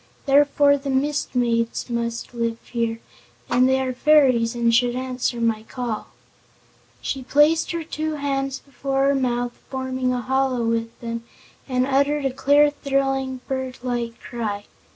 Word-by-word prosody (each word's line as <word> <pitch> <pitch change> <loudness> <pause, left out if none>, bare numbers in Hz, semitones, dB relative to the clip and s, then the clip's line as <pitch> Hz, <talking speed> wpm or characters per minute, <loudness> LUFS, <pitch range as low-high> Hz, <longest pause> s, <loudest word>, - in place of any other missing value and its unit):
Therefore 285 0 +4
the 275 0 -5
Mist 280 +1 0
Maids 230 -2 0
must 235 0 -3
live 230 -1 -1
here, 230 -2 -2 0.5
and 250 +1 +4
they 265 0 +3
are 260 -1 -1
fairies 255 -4 +4
and 235 -1 +2
should 240 0 +3
answer 255 -1 -2
my 225 -2 +1
call." 230 -1 -4 1.0
She 270 - -2
placed 295 +5 +3
her 335 -1 -2
two 310 0 -3
hands 275 -2 -2
before 275 -1 -2
her - - +3
mouth, 245 -2 0 0.2
forming 260 -1 -2
a 250 - 0
hollow 260 -1 0
with 230 0 -2
them, 230 -1 -4 0.5
and 255 0 +2
uttered 280 +2 +1
a 270 - 0
clear, 290 +2 +4
thrilling, 270 -2 -1
bird 260 -1 -3
like 240 -2 -3
cry. 210 -4 -4
255 Hz, 150 wpm, -23 LUFS, 235-275 Hz, 1.0 s, Therefore